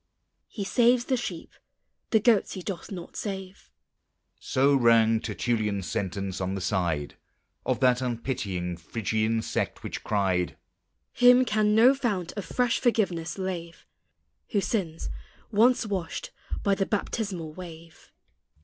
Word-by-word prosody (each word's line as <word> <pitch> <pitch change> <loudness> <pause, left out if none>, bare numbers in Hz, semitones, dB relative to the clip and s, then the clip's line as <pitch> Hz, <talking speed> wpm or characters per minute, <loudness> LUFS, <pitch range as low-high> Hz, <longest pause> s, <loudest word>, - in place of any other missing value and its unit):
He 205 - -5
saves 240 +4 +3
the 260 - +1
sheep, 190 -9 -5 0.6
the 220 - +4
goats 215 -2 +3
he 185 - -6
doth 195 0 -5
not 175 -3 -7
save. 190 -2 -6 0.7
So 135 +2 +2
rang 115 -3 +5
Tertullian's 105 -3 -1
sentence, 95 0 -3
on 95 +1 -1
the - - -3
side 85 -6 -1 0.5
Of - - 0
that 125 -1 +4
unpitying 105 -8 -3
Phrygian 110 +5 -1
Sect - - -2
which - - -5
cried: 95 -4 0 0.6
"Him 250 +1 +6
can 215 -2 +2
no 240 +4 +7
fount 205 -10 -2
of 205 - -6
fresh 245 -1 +1
forgiveness 190 -9 0
lave, 175 -3 -5 0.7
Who 205 - +4
sins, 175 -7 -2 0.4
once 235 +3 +4
washed 205 - -4 0.3
by 200 - +3
the 195 0 0
baptismal 195 -6 -2
wave." 165 -2 -11
170 Hz, 130 wpm, -27 LUFS, -, 0.7 s, no